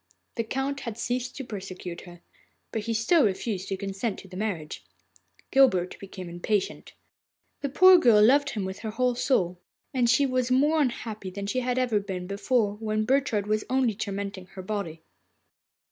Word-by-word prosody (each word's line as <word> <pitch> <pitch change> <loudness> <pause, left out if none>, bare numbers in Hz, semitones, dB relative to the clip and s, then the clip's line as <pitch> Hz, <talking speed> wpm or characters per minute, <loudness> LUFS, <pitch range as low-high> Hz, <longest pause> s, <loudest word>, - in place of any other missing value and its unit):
The 230 - -1
Count 270 +4 -2
had 230 -4 -6
ceased 250 +1 -2
to 270 - -5
persecute 185 -5 -7
her, 175 -1 -13 0.5
but 220 - -2
he 230 - -1
still 270 +9 +4
refused 195 -1 -1
his 195 - -2
consent 195 +2 -3
to - - -11
the 185 - -11
marriage. 185 -7 -4 0.7
Guilbert 190 -10 +3
became 190 -2 -8
impatient. 175 +4 -2 0.7
The 280 - -2
poor 370 +6 +7
girl 225 -8 +6
loved 285 +4 +4
him 205 -4 -3
with 190 +1 -5
her 220 - -4
whole 250 +3 +1
soul, 185 -9 0 0.3
and 245 -3 +2
she 265 +4 +4
was 255 -2 0
more 295 +5 +3
unhappy 225 -6 -3
than 200 +2 -6
she 230 +6 -1
had 250 0 -1 0.3
been 180 -2 -4
before, 205 +2 0
when 215 0 -1
Burchard 260 -5 +1
was 215 0 0
only 255 -3 +2
tormenting 200 -2 -5
her 190 0 -9
body. 180 -6 -4
215 Hz, 170 wpm, -27 LUFS, 195-255 Hz, 0.7 s, poor